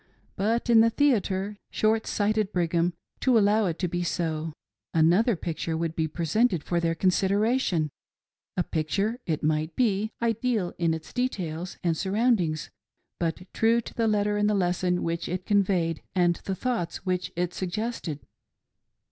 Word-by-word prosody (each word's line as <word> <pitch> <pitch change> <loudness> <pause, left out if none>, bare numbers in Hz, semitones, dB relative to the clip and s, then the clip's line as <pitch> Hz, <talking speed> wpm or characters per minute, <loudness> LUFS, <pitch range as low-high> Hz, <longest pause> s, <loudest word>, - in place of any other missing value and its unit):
But 225 +5 0
in 230 -2 +7
the 230 - +5
theatre 210 -6 +1
— - - -57
short 220 +1 +2
sighted 210 -1 +1
Brigham, 170 -1 +1 0.3
to 255 -3 +4
allow 210 0 +4
it 165 -2 -2
to 180 - -1
be 175 +1 -2
so! 160 -2 -2 0.2
— - - -65
another 180 +8 +4
picture 165 -1 -3
would 165 0 -2
be 160 -1 0
presented 170 +3 +1
for 175 - 0
their 165 -1 0
consider 195 +4 +2
ation,— 185 - +1 0.7
a 180 - +2
picture, 195 +10 -1
it 155 -3 -1
might 155 +1 0
be, 215 -3 +1
ideal 230 -4 0
in 165 -1 +2
its 160 -1 -10
details 180 -9 -3
and 170 -2 +2
surround 210 +5 +2
ings, 155 -2 -3 0.5
but 170 +1 -2
true 230 +1 +3
to 235 - -8
the 230 -1 +1
letter 210 -1 +1
in 210 - +3
the 210 - +2
lesson 180 -1 +1
which 170 0 -2
it 180 +1 -3
conveyed 185 -5 +1
and 175 -2 +3
the 190 - -1
thoughts 205 -6 -3
which 185 -1 -1
it 175 0 -1
suggested. 185 -5 -3
185 Hz, 165 wpm, -27 LUFS, 170-215 Hz, 0.7 s, in